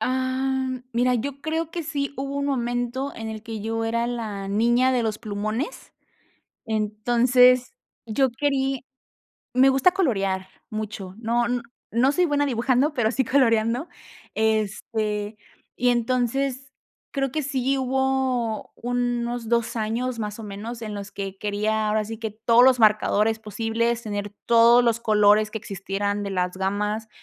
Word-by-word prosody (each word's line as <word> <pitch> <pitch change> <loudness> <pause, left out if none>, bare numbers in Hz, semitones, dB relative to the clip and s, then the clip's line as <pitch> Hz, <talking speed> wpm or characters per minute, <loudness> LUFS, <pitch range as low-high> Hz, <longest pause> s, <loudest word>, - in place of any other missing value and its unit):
Ah, 260 +2 0 0.2
mira, 250 +1 +2
yo 275 +4 -3
creo 320 0 -2
que 340 - -4
sí, 285 -3 -3
hubo 275 +1 -4
un 280 - -1
momento 245 +1 -2
en 225 0 -6
el 220 -1 -6
que 225 -2 -6
yo 225 +1 -2
era 235 +1 0
la 215 -5 -4
niña 240 +5 +3
de 245 -2 +1
los 215 -1 -2
plumones. 215 +5 -4 0.7
Entonces 240 - +3 0.3
yo 260 +4 +2
querí 270 0 -1 0.7
me 260 +2 +6
gusta 270 +7 +4
colorear 195 - 0 0.2
mucho. 210 -3 -5
No, 235 +1 0
no 245 0 -1 0.3
no 255 +4 +3
soy 360 - +2
buena 290 -2 +1
dibujando, 260 +3 +1
pero 230 -4 +1
sí 265 0 0
coloreando, 240 +3 +2 0.4
este, 215 0 -1 0.4
y 245 0 +2
entonces 255 +2 0 0.4
creo 270 -2 -1
que 310 -2 -1
sí 270 0 0
hubo 260 -4 0
unos 240 -1 -2
2, 235 0 +1
años 230 +3 -2
más 210 0 -4
o - - -7
menos 215 +4 -7
en 215 -2 -5
los 200 0 -7
que 195 -1 -6
quería, 210 +1 0
ahora 215 0 +1
sí 225 +1 -6
que 220 -2 -4
todos 230 +2 +4
los 255 -1 +5
marcadores 215 0 +3
posibles, 225 +2 -1
tener 205 -1 -4
todos 235 +1 +6
los 230 0 +1
colores 215 0 +4
que - - -3
existieran 200 0 -3
de 200 - -3
las 180 -1 -1
gamas, 210 +3 -2
235 Hz, 150 wpm, -24 LUFS, 215-260 Hz, 0.7 s, me